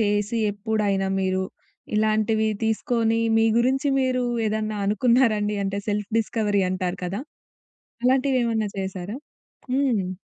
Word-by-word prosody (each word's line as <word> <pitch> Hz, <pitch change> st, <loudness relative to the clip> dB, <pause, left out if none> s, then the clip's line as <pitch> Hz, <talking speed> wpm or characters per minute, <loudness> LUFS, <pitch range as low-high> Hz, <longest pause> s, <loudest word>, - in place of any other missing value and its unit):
చేసి 205 Hz, +1 st, +1 dB, 0.2 s
ఎప్పుడైనా 205 Hz, -2 st, 0 dB
"మీరు 190 Hz, 0 st, 0 dB, 0.5 s
ఇలాంటివి 220 Hz, 0 st, +2 dB, 0.2 s
తీసుకొని 225 Hz, 0 st, +1 dB, 0.2 s
మీ 225 Hz, 0 st, +4 dB
గురించి 265 Hz, +4 st, +2 dB
మీరు 255 Hz, -1 st, +1 dB, 0.2 s
ఏదన్నా 215 Hz, 0 st, -1 dB
అనుకున్నారండి?" 215 Hz, -1 st, +2 dB
అంటే 195 Hz, +1 st, -2 dB
సెల్ఫ్ 210 Hz, +1 st, -2 dB
డిస్కవరీ 210 Hz, -3 st, 0 dB
అంటారు 185 Hz, -1 st, -2 dB
కదా! 190 Hz, +5 st, -3 dB, 0.8 s
అలాంటివి 260 Hz, +1 st, +3 dB
ఏమన్నా 220 Hz, -2 st, 0 dB
చేశారా? 190 Hz, +2 st, -4 dB, 0.6 s
హ్మ్. 245 Hz, -9 st, +1 dB
215 Hz, 110 wpm, -24 LUFS, 200-235 Hz, 0.8 s, మీ